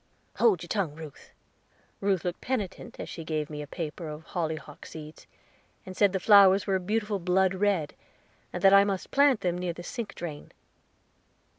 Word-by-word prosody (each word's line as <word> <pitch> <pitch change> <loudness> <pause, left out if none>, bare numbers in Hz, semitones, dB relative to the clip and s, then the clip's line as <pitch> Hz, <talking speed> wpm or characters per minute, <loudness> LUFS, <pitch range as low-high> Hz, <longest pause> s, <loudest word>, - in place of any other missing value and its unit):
"Hold 205 -8 +3
your - - -8
tongue, 180 -7 -1
Ruth." 155 -3 -11 0.7
Ruth 195 -4 0
looked 175 -1 -3
penitent 220 -8 -4
as - - -5
she 165 - -7
gave 155 -1 -3
me 150 0 -5
a 145 - -7
paper 165 +1 -5
of 150 +1 -7
hollyhock 155 -4 -5
seeds, 155 -1 -11 0.6
and 185 -1 -8
said 200 0 +4
the 190 - -1
flowers 200 -1 +6
were 195 - 0
a - - -4
beautiful 210 +2 -1
blood 185 +1 +2
red, 190 -6 0 0.6
and - - -5
that 195 0 +7
I 200 0 +8
must 195 -2 -3
plant 280 -4 +4
them 175 -1 -1
near 180 -1 -2
the 175 - -9
sink 230 +3 -6
drain. 155 -4 -7
180 Hz, 180 wpm, -28 LUFS, 160-200 Hz, 0.7 s, I